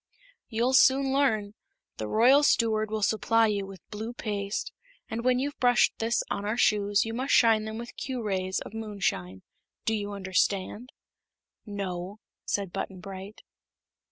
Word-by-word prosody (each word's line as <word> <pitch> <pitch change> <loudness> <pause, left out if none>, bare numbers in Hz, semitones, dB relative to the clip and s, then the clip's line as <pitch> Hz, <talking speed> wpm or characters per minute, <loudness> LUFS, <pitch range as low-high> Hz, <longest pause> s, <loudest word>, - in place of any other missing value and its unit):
"You'll 235 +3 +1
soon 265 +1 +5
learn. 220 -7 +1 0.4
The 110 - -4
Royal 250 - +5
Steward 220 -6 +2
will 215 -1 -2
supply 225 +2 +3
you 200 -2 -1
with 195 -1 -12
blue 220 +3 -5
paste, 205 -3 -3 0.4
and 230 +1 -3
when 250 0 +3
you've 285 +3 -3
brushed 245 -2 +3
this 230 +1 +1
on 200 - -3
our 215 +3 -1
shoes 205 -2 +3
you 225 - -4
must 260 +4 +1
shine 220 -2 +4
them 220 0 -5
with 235 +1 -8
Q 255 -3 -4
rays 190 -2 -1
of - - -9
Moonshine. 195 - -3 0.4
Do 225 - +1
you 205 -1 -2
understand?" 195 +4 -1 0.8
"No," 195 -1 -5 0.3
said 195 -3 -2
Button 190 -2 -4
Bright. 195 +2 -9
215 Hz, 155 wpm, -28 LUFS, 200-235 Hz, 0.8 s, soon